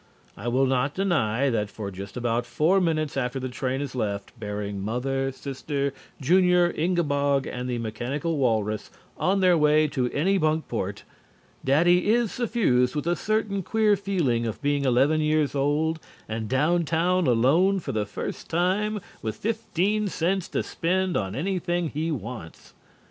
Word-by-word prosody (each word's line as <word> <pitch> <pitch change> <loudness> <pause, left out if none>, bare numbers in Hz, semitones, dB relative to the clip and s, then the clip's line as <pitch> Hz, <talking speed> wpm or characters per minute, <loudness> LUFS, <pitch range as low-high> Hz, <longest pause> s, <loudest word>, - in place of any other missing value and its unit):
I - - -7
will 130 +3 +3
not 135 +2 0
deny 140 - +1
that 105 -3 -1
for 100 -1 -6
just 95 +4 -8
about 120 0 -1
four 160 +10 +2
minutes 155 -4 0
after 130 -1 -1
the 130 0 -4
train 130 +2 -2
has 140 -3 -4
left, 100 -5 -3
bearing 105 -2 -4
Mother, 135 +5 -1
Sister, 140 +1 -3 0.3
Junior, 180 +3 +4
Ingabog 145 -5 +1
and 125 +1 -4
the 120 - -1
mechanical 135 +8 -3
walrus 110 -4 0 0.3
on 195 +1 +1
their 180 -2 +5
way 155 0 +4
to 130 -3 -1
Anybunkport, 155 - 0 0.6
Daddy 175 +7 +3
is 235 -1 +3
suffused 185 - +1
with 150 - -2
a 175 +1 +2
certain 215 -1 -1
queer 215 +2 +2
feeling 165 -13 0
of 110 - -4
being 145 -1 +1
eleven 135 +5 +3
years 155 -1 +1
old 150 +3 +1 0.3
and 110 0 -4
down 155 +7 +2
town 170 +2 +1
alone 150 +12 +3
for - - -5
the 105 -2 -1
first - - -6
time 195 +5 +1 0.2
with 110 -1 -3
fifteen 215 -1 -1
cents 185 0 -1
to - - -2
spend 185 +1 -1
on 95 -1 -1
anything 175 0 -1
he 155 +3 -2
wants. 115 - -7
145 Hz, 155 wpm, -25 LUFS, 125-175 Hz, 0.6 s, their